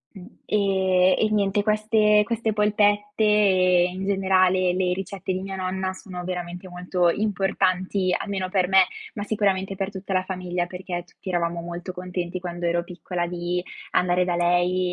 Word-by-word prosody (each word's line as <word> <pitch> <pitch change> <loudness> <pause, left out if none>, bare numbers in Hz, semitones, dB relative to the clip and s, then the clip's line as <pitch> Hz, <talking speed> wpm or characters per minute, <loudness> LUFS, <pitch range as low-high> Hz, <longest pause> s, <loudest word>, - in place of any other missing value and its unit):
Mh. 185 -2 -10 0.2
Ehm, 190 -2 +3
e 215 - +2
niente 205 -1 +1
queste 215 0 +3
queste 230 0 -1
polpette 210 0 +1
e, 185 -4 +4
in 185 +2 -5
generale, 185 -2 +2
le 180 -1 +1
ricette 190 0 -4
di 185 - -2
mia 195 0 -5
nonna 185 0 -2
sono 185 -2 -8
veramente 180 0 -5
molto 180 0 0
importanti, 190 -1 0
almeno 190 -2 -3
per 185 -2 +1
me, 190 0 +6 0.3
ma 205 - -4
sicuramente 195 -2 0
per 195 0 -2
tutta 195 0 -6
la 185 0 +1
famiglia 180 -2 -3
perché 180 -1 -5
tutti 185 - -12
eravamo 170 -1 -1
molto 175 +2 -6
contenti 180 0 -4
quando 175 -1 -4
ero 170 0 0
piccola 175 0 -4
di 175 0 -3 0.3
andare 180 0 +2
da 175 -1 -1
lei 175 +1 +1
185 Hz, 160 wpm, -24 LUFS, 180-195 Hz, 0.3 s, me